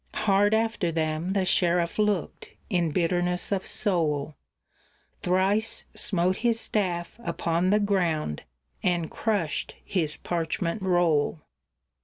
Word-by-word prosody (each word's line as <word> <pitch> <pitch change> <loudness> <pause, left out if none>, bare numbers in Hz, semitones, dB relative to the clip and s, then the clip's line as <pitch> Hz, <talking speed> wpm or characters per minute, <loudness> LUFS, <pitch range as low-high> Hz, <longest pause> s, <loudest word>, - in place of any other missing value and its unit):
Hard 205 +1 +3
after 220 -6 0
them 160 +3 -1
the 195 -2 +1
sheriff 175 0 +1
looked, 210 -6 -1 0.2
in 175 -3 +2
bitterness 180 +2 0
of 195 -1 -1
soul; 155 -7 0 0.9
Thrice 195 +5 +1
smote 185 -1 +1
his 230 0 +1
staff 185 -3 -1
upon 170 +1 0
the 210 +2 +4
ground, 175 - 0 0.4
and 175 -3 0
crushed 200 -9 -1
his 160 -6 -1
parchment 170 +3 -2
roll. 175 -5 +2
180 Hz, 110 wpm, -26 LUFS, 165-200 Hz, 0.9 s, the